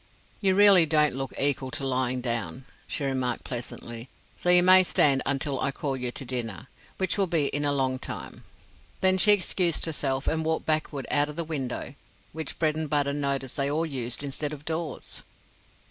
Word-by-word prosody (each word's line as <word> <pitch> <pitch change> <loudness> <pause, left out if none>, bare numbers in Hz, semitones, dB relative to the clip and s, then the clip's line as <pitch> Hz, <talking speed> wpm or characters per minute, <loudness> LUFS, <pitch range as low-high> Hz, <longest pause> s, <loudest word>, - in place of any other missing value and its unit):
"You 190 -2 +2
really 195 -4 +7
don't 150 -1 +3
look 135 0 -4
equal 140 -1 0
to 135 +1 -4
lying 130 -1 -1
down," 120 +1 -3 0.2
she - - -3
remarked, 130 -3 -2
pleasantly; 120 0 -6 0.3
"so 180 - -2
you 180 0 +7
may 185 +1 +8
stand 140 -6 +4
until 140 0 -1
I - - 0
call 135 0 -3
you 125 -1 -3
to 130 - -6
dinner, 115 -8 -5 0.3
which 190 +2 -1
will 195 - +2
be 160 -5 +1
in 145 +1 -2
a 145 - +2
long 130 -2 0
time." - - -8 0.6
Then 190 0 +3
she 210 - +6
excused 180 -3 +2
herself 140 -4 -2
and 160 0 0
walked 160 0 -1
backward 155 -3 -1
out 145 0 +2
of 150 - -8
the 170 - -1
window, 140 -5 -4 0.4
which 160 -1 -5
Bredenbutta 150 -3 0
noticed 140 -2 -2
they 140 0 +1
all 155 +3 0
used 130 -3 -4
instead 145 +2 -4
of 150 0 -10
doors. 160 -3 -5
145 Hz, 180 wpm, -26 LUFS, 130-160 Hz, 0.6 s, may